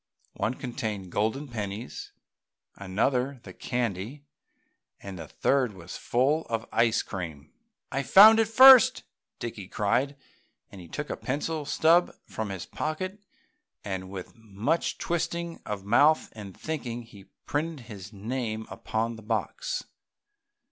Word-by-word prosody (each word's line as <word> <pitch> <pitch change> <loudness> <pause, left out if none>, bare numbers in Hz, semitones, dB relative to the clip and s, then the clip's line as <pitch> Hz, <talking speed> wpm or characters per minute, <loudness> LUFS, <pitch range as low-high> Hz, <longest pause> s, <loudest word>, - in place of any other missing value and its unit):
One 120 - -1
contained 110 -6 -4
the - - -12
golden 110 +10 -1
pennies, 110 -1 -6 0.6
another 125 +7 -1
the - - -10
candy 120 +3 -3 0.7
and 95 -2 -8
the - - -7
third 130 -5 +1
was 90 -1 -9
full 140 +6 +1
of 115 -1 -2
ice 115 -1 +2
cream. 80 -7 -7 0.4
"I 140 - 0
found 215 +9 +8
it 225 - +3
first!" 255 +2 +8 0.3
Dickie 110 -5 -6
cried 120 +9 0 0.6
and 100 - -10
he 85 - -11
took 150 - -5
a - - -2
pencil 150 +3 -3
stub 165 +4 +3
from 110 -2 -5
his 95 -3 -5
pocket 185 +6 -4 0.6
and, 95 -2 -4
with 95 -2 -8
much 110 +8 -2
twisting 170 0 -2
of 100 -2 -4
mouth 145 +9 +4
and 100 -4 -10
thinking, 125 -7 -4
he 105 -4 -15 0.2
printed 155 0 -2
his 105 -3 -9
name 110 +1 -4
upon 115 +1 -2
the - - -11
box. 110 -2 -2
115 Hz, 135 wpm, -27 LUFS, 100-150 Hz, 0.7 s, found